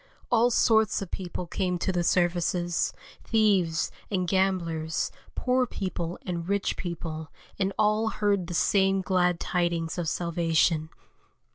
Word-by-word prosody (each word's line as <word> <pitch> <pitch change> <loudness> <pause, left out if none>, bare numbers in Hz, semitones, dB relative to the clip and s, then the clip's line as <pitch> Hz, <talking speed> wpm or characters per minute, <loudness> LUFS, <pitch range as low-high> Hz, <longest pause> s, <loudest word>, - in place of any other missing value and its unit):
All 235 +2 +5
sorts 220 -2 +3
of 190 - -11
people 180 -1 -4
came 180 +1 -1
to 190 - -1
the 175 -1 0
services, 175 0 +1 0.3
thieves 195 -8 +2 0.2
and 185 -3 -1
gamblers, 170 -4 0 0.2
poor 255 0 +1
people 180 -5 -4
and 170 -1 -4
rich 200 0 0
people, 160 -3 -5 0.3
and 195 0 +1
all 215 +1 +2
heard 200 -4 0
the 175 - -4
same 195 +2 +3
glad 180 -2 +1
tidings 170 -2 -1
of 165 -3 -1
salvation. 165 -2 +1
180 Hz, 130 wpm, -27 LUFS, 170-195 Hz, 0.3 s, All